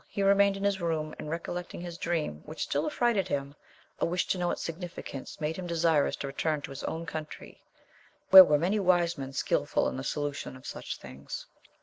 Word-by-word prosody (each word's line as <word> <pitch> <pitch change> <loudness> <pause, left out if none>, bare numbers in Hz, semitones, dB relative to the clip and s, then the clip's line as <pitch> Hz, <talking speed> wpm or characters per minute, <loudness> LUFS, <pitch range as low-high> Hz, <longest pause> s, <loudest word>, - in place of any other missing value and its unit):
He 200 - -2
remained 200 0 +4
in 195 - -5
his 200 -2 +1
room, 155 -2 -1
and 150 - -6
recollecting 175 +2 -4
his 175 -1 -7
dream, 155 - -2
which 155 - -4
still - - -1
affrighted 235 - +1
him, 140 -4 -2 0.5
a - - +2
wish 175 +1 0
to 185 - +1
know 175 0 +1
its - - -2
signifi 170 +1 -6
cation 135 - -7
made 155 +1 -1
him 185 -1 -5
desirous 165 -3 +2
to - - -5
return 150 +2 -1
to 145 - -6
his 135 - -7
own 165 +1 -3
country, 155 0 -7 0.7
where 190 0 +14
were 150 -4 +3
many 185 +7 +1
wise 175 -3 +3
men 135 -3 -6
skilful - - +1
in - - -3
the 130 - -4
solution 145 -2 -3
of 130 - -16
such - - -5
things. 70 +2 -8
165 Hz, 210 wpm, -29 LUFS, 150-180 Hz, 0.7 s, where